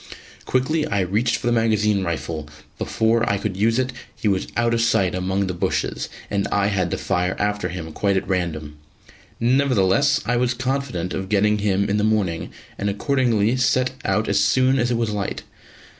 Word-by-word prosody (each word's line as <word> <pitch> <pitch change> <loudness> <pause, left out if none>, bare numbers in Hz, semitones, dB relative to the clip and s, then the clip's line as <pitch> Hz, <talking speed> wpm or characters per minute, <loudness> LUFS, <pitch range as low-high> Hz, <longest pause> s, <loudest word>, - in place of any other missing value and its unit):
Quickly 150 +5 +1
I 100 -9 0
reached 105 +6 +1
for - - -5
the 120 - +2
magazine 105 -3 +2
rifle, 80 -3 -4 0.3
but - - -2
before 115 +1 +1
I 100 - +1
could 100 -1 -3
use 110 +4 +2
it, 130 0 0 0.2
he - - -3
was 95 -2 +1
out 120 0 +2
of 115 - +1
sight 100 -5 +2
among 95 +2 -1
the 95 - -3
bushes, 85 - -2 0.2
and 100 -1 -1
I 100 0 +1
had 95 -4 0
to - - -2
fire 90 -1 -1
after 105 -3 -1
him 80 -2 -6
quite 100 +2 +1
at - - -2
random. 80 -5 -2 0.6
Nevertheless 130 +2 +3
I 120 +1 +1
was 120 0 +1
confident 130 -9 -2
of 95 0 -4
getting 105 +1 +2
him 100 -1 +1
in 100 - +1
the 105 - +1
morning, 105 -6 0 0.3
and 100 - 0
accordingly 115 0 +1
set 125 0 +2
out - - 0
as - - +2
soon 130 +1 +3
as 120 0 +1
it 120 - +1
was 115 -2 -1
light. 100 -2 -3
105 Hz, 190 wpm, -22 LUFS, 95-120 Hz, 0.6 s, Nevertheless